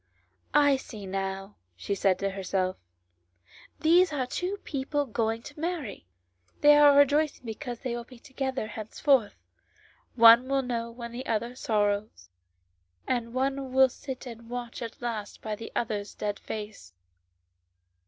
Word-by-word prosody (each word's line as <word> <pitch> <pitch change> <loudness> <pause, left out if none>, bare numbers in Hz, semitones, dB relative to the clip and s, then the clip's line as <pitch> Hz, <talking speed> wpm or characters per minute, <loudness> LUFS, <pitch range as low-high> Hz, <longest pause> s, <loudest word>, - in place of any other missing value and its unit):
"I 285 -2 +5
see 215 -6 -9
now," 195 +1 -4 0.2
she 95 - -3
said 195 -1 +2
to 195 0 -1
herself; 190 -1 -1 1.1
"these 340 +2 +5
are 275 -4 -1
two 360 +10 -3
people 285 +1 -2
going 225 -1 -1
to 295 0 -11
marry, 315 - -4 0.4
and - - -36
they 295 0 +8
are 290 -1 +7
rejoicing 285 -1 +3
because 240 +1 -6
they 250 -3 -2
will 240 - -5
be 250 +1 -15
together 265 0 -3
henceforth. 220 +3 +1 0.8
One 230 +1 +8
will 275 0 +1
know 235 -2 -3
when 235 0 -8
the 250 +3 -6
other 230 +2 -1
sorrows, 205 - -1 0.8
and 240 -2 -1
one 270 0 -1
will 265 0 +6
sit 265 +1 -8
and 230 -1 -10
watch 245 -1 -5
at 230 0 -7
last 220 -4 -4
by 215 -1 -3
the 225 +2 -9
other's 210 -3 -2
dead 205 -1 -3
face. 210 - -7
235 Hz, 145 wpm, -28 LUFS, 210-270 Hz, 1.1 s, they